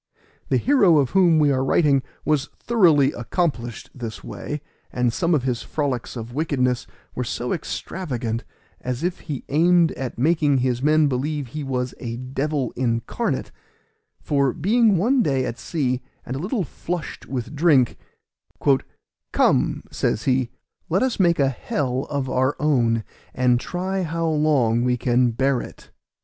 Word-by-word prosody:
The 130 - +3
hero 205 - +4
of 135 -4 +2
whom 180 -4 +5
we 150 -2 +4
are 130 -1 +1
writing 140 0 +3 0.2
was 150 -3 +1
thoroughly 165 - +4
accomplished 120 - -3
this 115 -4 -7
way, 150 0 -6 0.3
and 125 -2 0
some 170 +2 +2
of 140 - 0
his 125 -3 -1
frolics 135 -6 -3
of 115 0 -7
wickedness 125 -4 0 0.3
were 125 - -2
so 120 +1 -2
extravagant, 125 -8 -4 0.4
as 125 +3 -4
if 180 +1 -1
he 145 -5 -6
aimed 170 +3 +4
at 130 -4 -5
making 145 +1 +3
his 125 -1 0
men 155 +2 +4
believe 140 0 -1
he 150 +4 -5
was 125 -2 -2
a 115 -1 -5
devil 135 +1 -2
incarnate; 115 -2 -1 0.7
for 140 -3 +1
being 215 +3 +3
one 245 +9 +3
day 135 - +1
at 120 -1 -5
sea, 130 -6 -1 0.2
and 125 - -4
a - - -3
little 195 - -1
flushed 175 +3 -5
with 130 +2 -4
drink, 145 -6 +4 1.4
"Come," - - +2
says 110 - -1
he, 130 -2 +1 0.4
"let 185 +7 +2
us 260 -4 -1
make 170 -3 +4
a 140 -2 +3
hell 130 +1 -2
of 140 -3 -2
our 130 +2 +1
own, 120 -7 +2 0.3
and 125 -1 +3
try 185 +6 -3
how 165 -1 -2
long 150 -7 +2
we 125 0 +1
can 125 0 +2
bear 130 +2 +1
it." - - -12
140 Hz, 155 wpm, -23 LUFS, 125-160 Hz, 1.4 s, whom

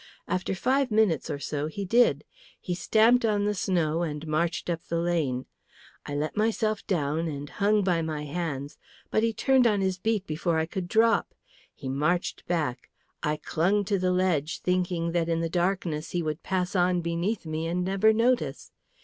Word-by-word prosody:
After 185 +1 -1
five 265 +7 +1
minutes 210 -8 +2
or - - -2
so 145 +1 -3
he 195 +6 -5
did. 240 +6 +3 0.4
He 180 - -3
stamped 225 +7 +4
on 210 -2 +1
the 210 - +1
snow 170 -4 0
and 150 -2 -3
marched 165 +2 -1
up 170 -2 -2
the 170 - -1
lane. 160 -7 0 0.6
I 145 - -4
let 150 +2 -2
myself 215 0 0
down 160 -2 0
and 145 -2 -5
hung 205 +5 +1
by 175 -3 +1
my 155 -2 -3
hands, 145 -3 -4 0.3
but 215 - +2
he 230 0 +2
turned 260 +2 +3
on 205 -3 +2
his 190 -1 0
beat 215 -1 0
before 160 +1 -1
I 160 - +1
could 175 +2 -5
drop. 225 +4 +2 0.4
He 135 - -8
marched 150 +7 -1
back; 150 -8 -2 0.3
I 150 0 0
clung 195 +7 +1
to 200 -1 0
the 185 0 +1
ledge, 175 -5 0
thinking 180 -2 0
that 170 -1 0
in 165 0 +1
the 165 0 -1
darkness 175 -3 -1
he 175 -1 -1
would 155 +1 -3
pass 185 0 -2
on 180 -1 +2
beneath 170 +5 -2
me 160 +1 -3
and 180 +2 -1
never 195 +3 +4
notice. 240 +3 0
175 Hz, 185 wpm, -27 LUFS, 160-205 Hz, 0.6 s, stamped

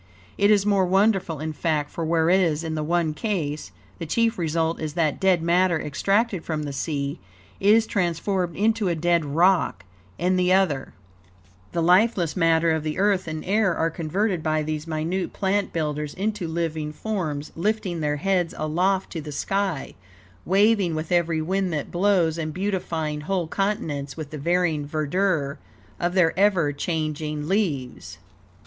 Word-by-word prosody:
It 200 0 +3
is 205 -2 +4
more 200 -3 +3
wonderful, 190 -4 +2
in 155 +1 -4
fact; 150 -1 -1
for 165 - -4
whereas, 165 0 +2
in 160 -1 -3
the 155 - -2
one 165 0 0
case, 155 -6 -3 0.3
the 165 - -5
chief 230 +5 +1
result 165 0 0
is 155 -2 -3
that, 155 -4 +1
dead 185 -3 +3
matter 175 0 +3
extracted 195 - 0
from 155 -2 -3
the 145 -1 -5
sea 140 0 -3 0.4
is 215 +3 +5
transformed 180 -2 -1
into 220 0 +1
a 175 - +1
dead 170 +1 +2
rock; 155 - +2 0.3
in 180 +2 +1
the 180 0 +2
other, 170 -9 +1 0.8
the 170 - -1
lifeless 180 -1 +3
matter 165 -2 +3
of 160 0 0
the 155 +1 -3
earth 195 -2 +2
and 155 0 -5
air 195 -2 +2
are 165 0 0
converted 180 +3 -1
by 155 0 0
these 155 +1 -4
minute 165 +4 -2
plant 200 +1 0
builders 150 -2 -3
into 205 -2 -2
living 160 -2 -2
forms, 155 -6 -4
lifting 185 -1 -1
their 150 -1 0
heads 180 0 0
aloft 180 +5 0
to 165 - -4
the 150 0 -7
sky, 195 0 -2 0.5
waving 195 -2 +3
with 155 +2 -4
every 170 -2 +1
wind 190 +2 0
that 150 -2 -3
blows, 175 -3 +2
and 155 -1 -4
beautifying 170 -6 -2
whole 180 +2 -1
continents 160 -7 -2
with 155 -3 -6
the 155 - -6
varying 170 -1 +1
verdure 155 -1 0 0.4
of 175 +1 -1
their 170 -4 +4
ever 185 -8 +3
changing 155 -1 -3
leaves." 135 - -2
170 Hz, 160 wpm, -24 LUFS, 155-190 Hz, 0.8 s, is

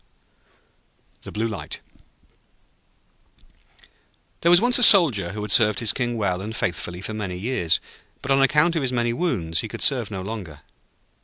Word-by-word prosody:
] - - -41
The - - -9
Blue 110 +2 -3
Light 110 -3 -7 2.6
There 170 - +2
was 175 0 +6
once 245 +3 +4
a - - -2
Soldier 135 - +5
who 105 0 -6
had 105 - -2
served 105 -3 +4
his 115 -3 +2
King 120 -3 -3
well 95 -4 -2
and 110 +3 -7
faithfully 90 -2 -4
for 110 - -6
many 100 -4 -5
years. 95 -5 -1 0.4
But, 140 - -3
on 135 0 +3
account 150 +5 +2
of 160 - -1
his 130 -2 -2
many 120 -1 -1
wounds, 85 - -2
he - - -3
could - - -4
serve 125 -7 +1
no 95 -3 -6
longer. 95 -8 -8
110 Hz, 170 wpm, -22 LUFS, 95-135 Hz, 2.6 s, was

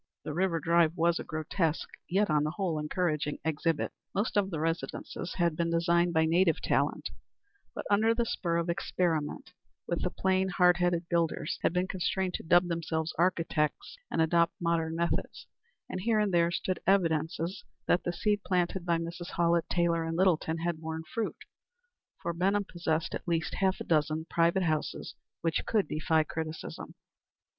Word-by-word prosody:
The 150 - -4
River 175 0 +1
Drive 170 0 +3
was 170 +1 +2
a - - -4
grotesque, 155 +1 -1 0.2
yet 200 +4 +2
on 150 -2 +2
the 150 - 0
whole 170 -2 -2
encouraging 150 -1 -1
exhibit. 160 0 0 0.2
Most 205 +3 0
of 200 -2 +2
the 165 -5 -3
residences 165 +2 -3
had 170 -3 +1
been 170 +1 0
designed 170 +1 +2
by 160 -1 +3
native 165 +1 +3
talent, - - 0 0.6
but - - -5
under 220 +3 +3
the 235 0 +1
spur 170 -6 -1
of 170 0 -1
experiment 170 -1 -1 0.3
even 170 - -1
the 180 - 0
plain, 190 +1 +1
hard 180 -1 +4
headed 175 -1 +1
builders 165 -3 0
had - - +2
been 180 +1 0
constrained 185 0 -1
to - - -4
dub 175 +2 +4
themselves 165 -1 -2
"architects," 170 - 0
and 160 - +2
adopt 170 +1 +2
modern 165 -1 0
methods; 170 +1 -2 0.4
and 185 - -4
here 225 +2 +2
and 210 -3 +1
there 170 -1 +4
stood 180 +2 -2
evidences 170 -1 +1 0.2
that 175 - +2
the 175 - -1
seed 205 +3 0
planted 180 0 0
by 170 -1 +3
Mrs. 170 +2 -6
Hallett 170 -1 +2
Taylor 170 -1 +1
and 165 0 -3
Littleton 170 -3 +2
had 165 -1 -2
borne 160 0 -4
fruit, 230 +5 -3 0.8
for 170 - -3
Benham 195 +4 +1
possessed 165 -2 -1
at - - -5
least 165 -2 0
half 190 -1 +2
a - - -4
dozen 155 0 +1
private 170 +3 +3
houses 155 -3 -2 0.3
which 165 -1 0
could 215 -3 +2
defy 160 0 +1
criticism. 160 +1 -6
170 Hz, 170 wpm, -30 LUFS, 160-180 Hz, 0.8 s, hard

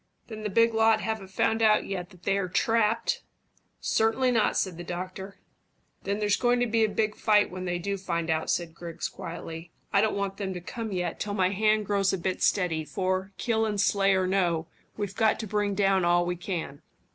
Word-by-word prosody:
Then 215 -1 -7
the 210 - -2
big 230 +3 +3
lot 220 0 +4
haven't 220 -3 -3
found 225 +4 0
out 215 -1 +4
yet 180 -2 -4
that 180 -1 -19
they're 195 -2 0
trapped?" 225 +3 +1 0.6
"Certainly 225 +4 +2
not," 225 -3 +2
said 185 -4 -1
the 175 - -6
doctor. 185 +3 -6 0.7
"Then 200 +1 0
there's 210 -1 +1
going 245 0 +2
to 245 - +2
be 225 -1 +2
a 220 - +2
big 215 0 0
fight 210 -1 +3
when 185 0 -5
they 175 -1 -1
do 200 +3 -3
find 170 -3 -2
it - - +5
out," 160 0 -2
said 170 -2 -1
Griggs 170 -1 -5
quietly. 165 +1 -8 0.2
"I 200 - +5
don't 215 0 +1
want 195 -1 -2
them 190 -2 -3
to - - -4
come 225 +5 -6
yet 180 -3 -2
till 205 -1 -3
my 185 -2 +2
hand 215 +2 +2
grows 200 -1 +2
a - - +1
bit 185 +1 -3
steady, 175 -5 +1
for, 185 +5 -2
kill 225 -2 0
and 210 -2 -1
slay 195 -1 +3
or 190 0 +1
no, 175 -4 +1 0.3
we've 205 -2 -4
got 220 -1 +2
to - - -4
bring 205 -1 -1
down 195 -2 +3
all 175 0 +3
we 175 0 -1
can." 170 -5 -5
195 Hz, 215 wpm, -27 LUFS, 180-215 Hz, 0.7 s, it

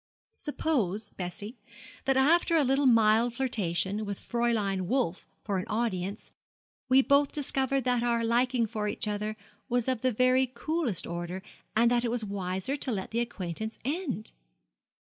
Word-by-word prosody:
'Suppose, 225 - -1
Bessie, 200 +6 -6 0.5
that 270 -1 +3
after 335 +5 +4
a 315 - +5
little 270 +1 +3
mild 230 0 +4
flirtation, 205 -5 -1
with 200 -2 -4
Fräulein 215 -6 0
Wolf 240 -7 0 0.2
for 200 -3 -1
an 185 - -5
audience, 210 -3 -2 0.6
we 265 +1 +6
both 280 +1 +4
discovered 270 -2 0
that 245 -1 +2
our 235 -1 +1
liking 240 +1 +2
for 215 -1 -3
each 210 - -2
other 210 +1 -2 0.3
was 245 -1 +1
of 255 -3 0
the 255 - +2
very 255 +3 +3
coolest 305 - -1
order, 175 +2 -5 0.3
and 235 +2 +4
that 240 0 +2
it 240 - 0
was 230 -2 -1
wiser 190 +4 -2
to 270 -3 -2
let 195 -4 -3
the 230 - 0
acquaintance 220 -2 -4
end?' 285 - -2
235 Hz, 155 wpm, -29 LUFS, 205-260 Hz, 0.6 s, we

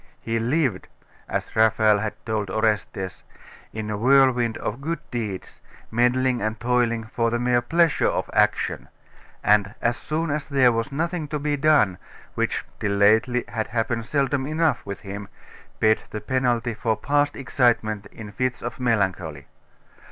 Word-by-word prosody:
He 115 0 -2
lived, 125 - 0 0.4
as - - -3
Raphael 110 -1 +4
had 105 0 -3
told 110 -3 -2
Orestes, 105 -3 -1 0.5
in 110 -1 -5
a 105 - -2
whirlwind 125 -1 +4
of 110 +6 -4
good 165 +4 -2
deeds, 105 -6 -5 0.3
meddling 125 +2 +2
and 110 +1 -2
toiling 120 -2 +1
for 115 +1 -1
the 120 - 0
mere 120 0 +2
pleasure 165 +5 +2
of - - -1
action; - - +1 0.6
and 105 0 +3
as 120 +1 0
soon 160 0 -2
as 150 0 -2
there 135 -4 +4
was 115 +4 -2
nothing 165 +2 -2
to 150 0 -3
be 145 0 -1
done, 140 - +3 0.3
which, - - -1
till 100 - -1
lately, 110 +5 +3
had 110 -2 -3
happened 115 -1 -2
seldom 140 -2 0
enough 155 -4 +1
with 100 - -6
him, 100 0 -7 0.5
paid 110 0 +3
the 105 - -5
penalty 120 -2 0
for 110 0 -1
past 145 0 +1
excitement 115 -6 +1
in 105 0 -10
fits 130 +2 -2
of 120 +1 -5
melancholy. 95 - -1
120 Hz, 150 wpm, -24 LUFS, 110-135 Hz, 0.6 s, Raphael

